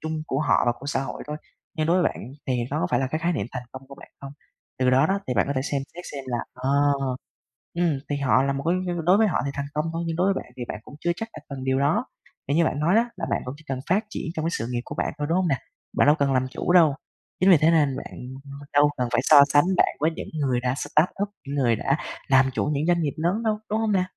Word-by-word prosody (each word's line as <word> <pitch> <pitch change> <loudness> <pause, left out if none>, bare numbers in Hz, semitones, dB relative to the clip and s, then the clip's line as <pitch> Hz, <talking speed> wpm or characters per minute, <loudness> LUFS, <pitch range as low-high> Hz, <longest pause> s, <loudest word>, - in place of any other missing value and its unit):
chung 160 0 -3
của 135 -1 -1
họ - - +3
và 120 - +4
của 140 - -9
xã 135 -1 0
hội 135 - -6
thôi. 150 0 -4 0.4
Nhưng 155 -1 0
đối 175 +2 +3
với - - +3
bạn - - -10 0.2
thì 125 -2 0
nó - - -1
có 90 - +1
phải - - +2
là 135 - 0
cái 155 +4 -2
khái 170 +2 0
niệm 150 - -2
thành 125 -2 -4
công 130 - -9
của 140 - -10
bạn - - -14
không? 140 0 -8 0.5
Từ 130 0 +3
đó 130 +1 +4
đó, 195 +1 +1
thì 125 - -1
bạn 100 - +2
có 140 - -1
thể 130 - +1
xem 140 -1 -2
xét 175 +1 -9
xem 135 -2 -6
là, 120 -1 -1 0.2
ờ, 130 +2 -2 1.0
ừm, 170 -5 +1
thì 145 - -1
họ 130 -3 +3
là 140 0 0
một 140 0 -4
cái 175 - +3 0.3
đối 185 +3 +5
với 220 0 +4
họ 190 - +1
thì 140 - -2
thành 140 0 -3
công 150 +1 -1
thôi, 165 +1 -2
nhưng 165 - -2
đối 185 +4 +2
với - - -4
bạn - - -19
thì 125 - -4
bạn 105 - -5
cũng - - -12
chưa 175 - +1
chắc 225 +5 -5
là - - -8
cần 135 -2 -6
điều 130 0 +1
đó. 160 - +2 0.4
Vì 140 - +1
như 170 - +4
bạn 145 - -1
nói 165 +6 +3
đó, 235 +2 +3
là 175 - -4
bạn - - 0
cũng 125 - -5
chỉ 155 - -17
cần 135 -1 -3
phát 200 +5 +2
triển - - -5
trong 155 - -2
cái 165 - +1
sự 115 - -3
nghiệp 120 -1 -1
của - - -7
bạn - - -2
thôi, 145 - -2
đúng 165 - +2
hông 185 - +1
nè? 140 -5 +1 0.4
Bạn - - +5
đâu 150 - +6
cần 140 -1 +2
làm 130 0 +1
chủ 130 - -2
đâu. 160 -6 +6 0.4
Chính 185 +2 +4
vì 180 - +8
thế 155 +3 +4
nên 145 -5 +3
bạn, - - -8 0.3
ừm, 140 0 -9
đâu 145 0 +5
cần 125 - 0
phải 120 - +2
so 145 -1 +8
sánh 145 +1 +6
bạn - - +3
với 155 +2 +2
những - - -6
người 135 -5 0
đã 125 0 0
startup, 180 +8 0 0.2
những 140 - -3
người 125 -5 +2
đã 135 +6 0 0.3
làm 130 -1 +5
chủ - - 0
những 145 +2 0
doanh 175 -1 +3
nghiệp 145 -3 -1
lớn 175 +8 0
đâu, 215 -2 0
đúng 215 +1 0
hông 220 -1 0
nè? 190 -2 +3
145 Hz, 300 wpm, -25 LUFS, 135-170 Hz, 1.0 s, vì